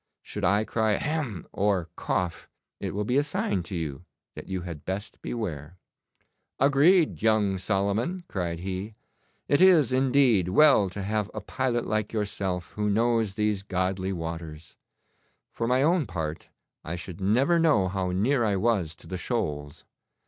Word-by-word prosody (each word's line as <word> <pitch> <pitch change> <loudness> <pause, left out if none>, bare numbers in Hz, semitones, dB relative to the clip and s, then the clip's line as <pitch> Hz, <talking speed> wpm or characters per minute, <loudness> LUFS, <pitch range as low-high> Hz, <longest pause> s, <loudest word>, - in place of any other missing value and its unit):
Should - - -6
I 100 +3 +3
cry 110 -1 +1
"hem!" 145 - -2
or 95 -5 0
cough, 90 -2 -2 0.3
it - - -4
will 105 - 0
be 125 +5 +1
a - - +5
sign 125 -9 -1
to 90 +2 -7
you 80 -2 -4 0.3
that - - -9
you 95 -1 -3
had 85 -4 -7
best 100 +3 -5
beware.' 90 -7 -5 0.8
'Agreed, 150 +6 +4
young 105 -3 +2
Solomon!' 105 - -1
cried 85 -3 -3
he. 95 +3 -5 0.5
'It 145 - +3
is, 165 -9 +6
indeed, 130 -8 +3
well 135 -3 +5
to 100 +2 -6
have 105 +1 -1
a - - -2
pilot 125 -3 -1
like 110 0 -1
yourself 95 -4 -2
who 105 0 -1
knows 115 -1 +1
these 105 -2 0
godly 95 0 -1
waters. 80 -3 -6 0.8
For 115 - -3
my 130 +2 +3
own 165 -3 +2
part, 80 -3 -5 0.3
I 85 - -4
should 90 +2 -7
never 130 - +3
know 150 - +3
how 95 0 -2
near 115 +8 +1
I 105 -3 +1
was 95 -6 0
to - - -15
the 95 - -4
shoals. 75 - -3
100 Hz, 155 wpm, -27 LUFS, 90-120 Hz, 0.8 s, is